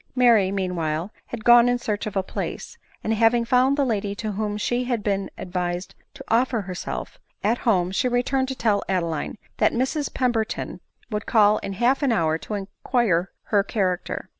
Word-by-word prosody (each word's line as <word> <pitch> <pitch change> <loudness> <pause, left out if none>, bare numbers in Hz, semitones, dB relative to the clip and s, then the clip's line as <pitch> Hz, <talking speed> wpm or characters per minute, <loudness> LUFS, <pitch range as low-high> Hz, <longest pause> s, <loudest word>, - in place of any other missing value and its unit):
Mary, 230 -7 +5
meanwhile, 180 -2 -2 0.2
had 225 -3 -7
gone 240 0 +7
in 245 - +2
search 215 -3 -3
of 210 - -6
a 195 - +1
place; 330 - -5 0.3
and 220 - 0
having 230 +2 +3
found 255 +3 +3
the 280 - +2
lady 205 -4 -1
to 215 +1 -3
whom 210 +1 -2
she 240 +4 -1
had 240 -4 -1
been 195 -2 -1
advised 180 0 -3 0.2
to - - -9
offer 235 0 +2
herself, 185 -2 -6 0.2
at 225 +4 +2
home, 180 -4 +2
she 195 - +1
returned 250 +2 +1
to 265 - -3
tell 215 -5 +1
Adeline 170 -1 -1 0.2
that - - +3
Mrs 265 +4 -1
Pemberton 235 -4 -1 0.3
would 210 0 -3
call 215 -2 +4
in 195 - -5
half 245 +8 +2
an 275 -3 +2
hour 160 -6 +1
to 210 - -5
inquire 195 -2 0
her 205 -2 +2
character. 190 -4 -2
215 Hz, 180 wpm, -24 LUFS, 190-245 Hz, 0.3 s, gone